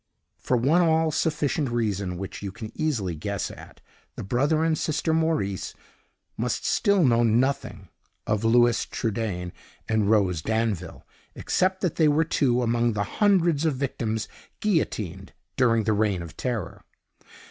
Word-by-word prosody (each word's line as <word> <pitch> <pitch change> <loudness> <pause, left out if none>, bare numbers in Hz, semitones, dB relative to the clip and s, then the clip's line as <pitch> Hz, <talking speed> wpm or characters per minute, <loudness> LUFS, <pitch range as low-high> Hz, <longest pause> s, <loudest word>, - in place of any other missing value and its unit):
For 125 - 0
one 145 +9 +3
all 160 -1 +3
sufficient 150 -3 0
reason, 100 -6 -1
which 95 +1 -7
you 100 -1 -5
can 110 +2 -8
easily 120 - -1
guess 100 +5 -4
at, - - -13 0.3
the - - -6
brother 145 +10 +1
and 165 -1 +2
sister 155 +1 -1
Maurice 160 - -1 0.6
must - - -2
still 200 -3 +3
know 120 -4 +4
nothing 120 +4 0 0.4
of 105 0 -1
Louis 120 +1 +4
Trudaine 100 -6 -3 0.3
and 110 -2 +1
Rose 95 -7 +2
Danville, 110 -3 -2 0.3
except 185 +1 0
that 180 -5 -1
they 160 - +4
were 150 +2 +3
two 125 -6 +1
among 120 0 +1
the 100 -1 -1 0.2
hundreds 175 -7 +3
of 155 -4 +1
victims 110 -5 -2 0.3
guillotined 105 - -2 0.2
during 115 -4 +3
the 110 0 +1
Reign 100 -4 0
of 85 -1 -10
Terror." 120 -7 -4
120 Hz, 145 wpm, -25 LUFS, 105-155 Hz, 0.6 s, know